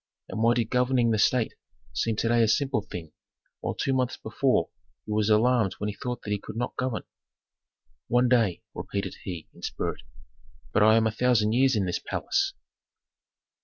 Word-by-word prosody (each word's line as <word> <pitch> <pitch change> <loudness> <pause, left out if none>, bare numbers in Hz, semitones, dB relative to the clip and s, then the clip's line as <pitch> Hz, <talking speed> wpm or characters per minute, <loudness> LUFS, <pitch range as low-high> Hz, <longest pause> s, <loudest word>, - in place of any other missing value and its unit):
And 110 - -3
why 115 +1 +4
did 115 -2 -1
governing 125 -2 +3
the 110 - +1
state 115 +2 +2 0.4
seem 115 -1 0
to 115 - 0
day 120 0 +3
a 115 - +4
simple 135 0 +1
thing, 85 -5 -8 0.5
while - - -3
two 135 - 0
months 130 -2 0
before - - 0 0.3
he - - -6
was 105 0 +1
alarmed 110 -1 +3
when 105 - -3
he - - -4
thought 125 +1 -5
that 105 - -5
he 105 - 0
could - - -9
not 120 +2 -3
govern. 125 -6 -2 1.0
"One 125 +1 +3
day?" 115 -8 +2
repeated 100 -1 -4
he, 85 -4 -6
in - - -17
spirit. - - -3 0.7
"But - - +3
I 110 +1 +7
am 110 - +3
a 110 - +2
thousand 110 -2 +2
years 130 +1 +4
in 100 -3 +1
this 90 - -1
palace!" - - -1
115 Hz, 185 wpm, -27 LUFS, 105-125 Hz, 1.0 s, I